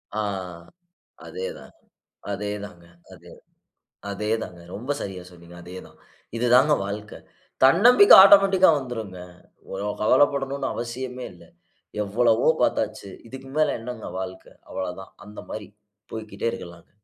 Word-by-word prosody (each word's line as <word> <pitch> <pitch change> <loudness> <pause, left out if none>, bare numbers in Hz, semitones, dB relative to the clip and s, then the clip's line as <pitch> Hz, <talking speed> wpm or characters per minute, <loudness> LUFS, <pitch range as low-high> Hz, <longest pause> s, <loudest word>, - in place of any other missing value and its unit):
அ - - -1 1.1
அதேதாங்க, 480 +2 -8 0.6
அதேதாங்க, 100 -3 -6 0.3
அதேதா - - -15 0.8
அதேதாங்க, 105 -3 -3
ரொம்ப 120 +7 -7
சரியா 95 -2 -6
சொன்னீங்க. 85 -1 -15
அதேதான் 90 +1 -11 0.4
இதுதாங்க 125 +5 +4
வாழ்க்க. 105 +1 -6 0.5
தன்னம்பிக்க 235 - +7
ஆட்டோமேட்டிக்கா 195 -2 +7
வந்துரும்ங்க. 110 -8 -7 0.5
ஒ - - -4 0.3
கவலைப்படணும்னு 140 +3 +2
அவசியமே 125 +1 -6
இல்ல. 85 -1 -17 0.6
எவ்வளவோ 115 +4 +2
பாத்தாச்சு 110 -2 -1 0.2
இதுக்கு 130 +2 -10
மேல 155 0 +2
என்னங்க 120 -1 -7
வாழ்க்க. 95 0 -7 0.2
அவ்வளதான் 95 0 -6
அந்த 105 0 -10
மாரி 105 -2 -6 0.5
போய்க்கிட்டே 110 0 -4
இருக்கலாங்க. 85 -5 -10
110 Hz, 100 wpm, -24 LUFS, 100-135 Hz, 1.1 s, தன்னம்பிக்க